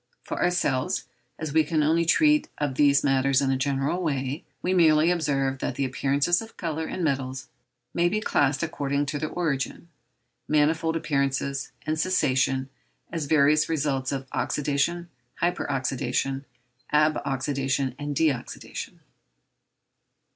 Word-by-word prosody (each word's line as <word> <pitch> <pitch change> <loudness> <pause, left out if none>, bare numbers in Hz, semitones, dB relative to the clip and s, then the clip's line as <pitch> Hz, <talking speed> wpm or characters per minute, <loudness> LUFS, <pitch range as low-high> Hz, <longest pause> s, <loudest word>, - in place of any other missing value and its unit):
For - - -4
ourselves, 160 -7 +1 0.3
as 155 -3 -5
we 160 - +5
can 155 0 +1
only 165 +3 +2
treat 300 - +4
of 145 -2 -1
these 140 +1 +4
matters 135 -1 +3
in 135 -1 +1
a - - +2
general 140 +5 0
way, 140 -2 -2 0.2
we 185 - +1
merely 160 -2 +5
observe 135 -5 0
that 130 - -3
the 135 +1 0
appearances 140 - +1
of 225 0 -11
colour 160 -2 -3
in 185 - -4
metals 135 -3 -2 0.4
may 170 0 +2
be 210 +4 0
classed 145 -8 +1
according 145 -3 -1
to 145 +1 -3
their 155 - -2
origin, 165 -1 -2 0.6
manifold 160 +2 +2
appearance, 140 -3 -1 0.2
and 155 0 -1
cessation, 135 -7 +1 0.4
as 165 -3 -2
various 150 0 +4
results 140 -4 0
of 135 -1 -4
oxydation, 150 +4 0 0.3
hyper 175 +1 -1
oxydation, 135 0 -1 0.5
ab 150 +1 +3
oxydation, 135 -1 -1
and 145 0 -3
de 160 +2 +4
oxydation. 125 -4 -6
145 Hz, 140 wpm, -26 LUFS, 135-160 Hz, 0.6 s, we